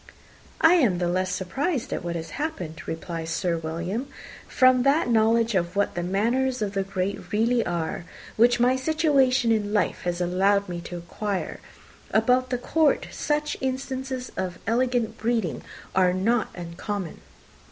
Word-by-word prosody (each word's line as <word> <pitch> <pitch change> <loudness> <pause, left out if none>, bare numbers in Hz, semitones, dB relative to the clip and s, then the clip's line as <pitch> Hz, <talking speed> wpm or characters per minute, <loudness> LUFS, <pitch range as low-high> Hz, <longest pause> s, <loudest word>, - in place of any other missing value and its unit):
"I 320 +2 +7
am 230 - +3
the 175 0 0
less 185 +1 0
surprised 250 - -2
at - - -3
what 170 -1 -3
has 165 -1 -5
happened," 180 - -5
replied 165 0 -4
Sir 175 0 0
William, 170 - -3 0.4
"from 255 -1 +4
that 275 +3 +3
knowledge 225 +1 +3
of 175 -1 0
what 200 0 +1
the 175 - -2
manners 230 +7 0
of 200 -1 -3
the 195 - 0
great 195 -1 -3
really 230 +3 +2
are, 170 0 -3 0.3
which 240 +2 +4
my 250 +2 +4
situation 265 -4 +2
in 210 -2 0
life 210 - +1
has 175 0 -2
allowed 195 +3 +2
me 175 -1 -5
to 175 - -6
acquire. 195 +3 -4 0.5
About 250 +3 +2
the 250 - 0
court, 305 +4 +1
such 300 0 -1
instances 260 -1 -3
of 185 -2 -3
elegant 235 -1 0
breeding 225 -7 -1 0.3
are 185 -1 +3
not 220 +5 +1
uncommon." 175 +2 -5
215 Hz, 150 wpm, -25 LUFS, 180-255 Hz, 0.5 s, I